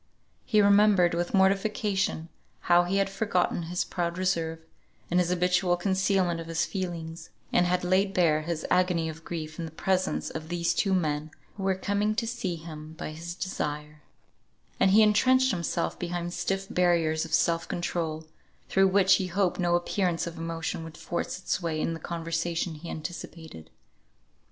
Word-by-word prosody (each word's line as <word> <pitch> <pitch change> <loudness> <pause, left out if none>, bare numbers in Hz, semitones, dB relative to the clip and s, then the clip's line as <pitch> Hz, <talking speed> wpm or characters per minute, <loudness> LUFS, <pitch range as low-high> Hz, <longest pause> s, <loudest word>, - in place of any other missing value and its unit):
He 215 -3 +4
remembered 200 -3 +5
with 175 +1 -1
mortification 195 -3 +1 0.3
how 175 0 +4
he 190 +3 0
had 195 0 +2
forgotten 195 -3 0
his 180 +1 0
proud 175 -1 -3
reserve, 170 -3 0 0.5
and 180 - +3
his 175 -1 +1
habitual 180 0 +2
concealment 190 -2 +1
of 165 - -7
his 165 +1 0
feelings, 170 -3 -5 0.2
and 175 - +4
had 180 0 +1
laid 190 +2 +2
bare 165 -5 +3
his 160 0 -3
agony 180 -3 +2
of 160 +1 -9
grief 155 -2 -6
in 165 - -2
the 160 - -8
presence 185 +3 -1
of 160 0 -6
these 170 -1 0
two 195 -2 +1
men 155 -3 -1 0.3
who 200 - -8
were 190 0 +1
coming 205 +2 0
to 230 - 0
see 225 -7 -3
him 155 -1 -9
by 160 - -6
his 170 +2 -7
desire; 150 -5 -4 0.8
and - - +5
he 215 +3 +6
entrenched 255 +5 +4
himself 170 -2 -2
behind 175 0 -3
stiff 195 +1 -2
barriers 170 -4 +2
of 165 - -7
self 165 0 +1
control, 160 -2 -3 0.4
through 195 0 +4
which 190 -1 +5
he 190 - -2
hoped 185 0 0
no 175 -1 +2
appearance 175 0 0
of 170 -1 -6
emotion 165 +1 -3
would 160 -1 -10
force 175 - -3
its 185 0 -2
way 165 -2 -2
in 165 - -1
the 165 - -6
conversation 165 0 -2
he 160 +2 -9
anticipated. 160 - -8
175 Hz, 170 wpm, -28 LUFS, 165-190 Hz, 0.8 s, he